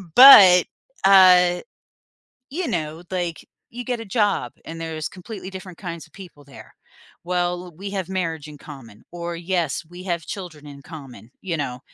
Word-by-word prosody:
But, 195 Hz, -9 st, +9 dB, 0.4 s
uh, 180 Hz, -2 st, +6 dB, 0.9 s
you 340 Hz, +5 st, -3 dB
know, 160 Hz, -1 st, -4 dB
like, 175 Hz, -3 st, -4 dB, 0.2 s
you 245 Hz, +1 st, -8 dB
get 245 Hz, -1 st, -3 dB
a -, -, -7 dB
job, 205 Hz, -, -1 dB
and 165 Hz, 0 st, -9 dB
there's 160 Hz, -2 st, -5 dB
completely 190 Hz, +1 st, -10 dB
different 185 Hz, -2 st, -10 dB
kinds 170 Hz, -3 st, -7 dB
of -, -, -27 dB
people 180 Hz, -7 st, -13 dB
there. 140 Hz, 0 st, -15 dB, 0.5 s
"Well, 180 Hz, 0 st, -2 dB
we 195 Hz, +2 st, -7 dB
have 190 Hz, -3 st, -4 dB
marriage 165 Hz, -5 st, -4 dB
in 150 Hz, -, -12 dB
common," 130 Hz, -8 st, -13 dB
or 170 Hz, 0 st, -6 dB
"Yes, 170 Hz, -3 st, -2 dB
we 175 Hz, +1 st, -11 dB
have 170 Hz, -4 st, -3 dB
children 170 Hz, -7 st, -8 dB
in 140 Hz, -1 st, -12 dB
common," 130 Hz, -8 st, -12 dB
you 175 Hz, -4 st, -3 dB
know, 130 Hz, -4 st, -4 dB
175 Hz, 160 wpm, -22 LUFS, 155-190 Hz, 0.9 s, But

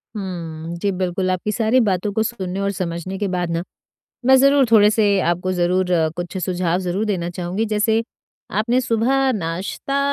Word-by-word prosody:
हम्म, 170 Hz, -4 st, -5 dB
जी 200 Hz, -, +1 dB
बिल्कुल, 185 Hz, 0 st, -1 dB
आपकी 185 Hz, +3 st, -2 dB
सारी 225 Hz, +3 st, +2 dB
बातों 190 Hz, +2 st, 0 dB
को 220 Hz, -, +1 dB
सुनने 195 Hz, -5 st, -4 dB
और 200 Hz, 0 st, 0 dB
समझने 185 Hz, 0 st, -4 dB
के 205 Hz, -, 0 dB
बाद 180 Hz, -2 st, -2 dB
ना, 165 Hz, +1 st, -1 dB, 0.6 s
मैं 265 Hz, 0 st, +7 dB
ज़रूर 275 Hz, +1 st, +5 dB
थोड़े 210 Hz, -2 st, +7 dB
से 215 Hz, 0 st, +2 dB, 0.2 s
आपको 180 Hz, +1 st, 0 dB
ज़रूर 180 Hz, +1 st, +1 dB
अ, 165 Hz, -2 st, +3 dB
कुछ 175 Hz, +2 st, -5 dB
सुझाव 180 Hz, -1 st, 0 dB
ज़रूर 185 Hz, +3 st, -1 dB
देना 185 Hz, -5 st, -1 dB
चाहूँगी 180 Hz, +4 st, -2 dB
जैसे 220 Hz, +2 st, +2 dB, 0.6 s
आपने 240 Hz, +4 st, +2 dB
सुबह 255 Hz, +3 st, +1 dB
नाश्ता 190 Hz, +8 st, -3 dB
190 Hz, 170 wpm, -20 LUFS, 175-220 Hz, 0.6 s, मैं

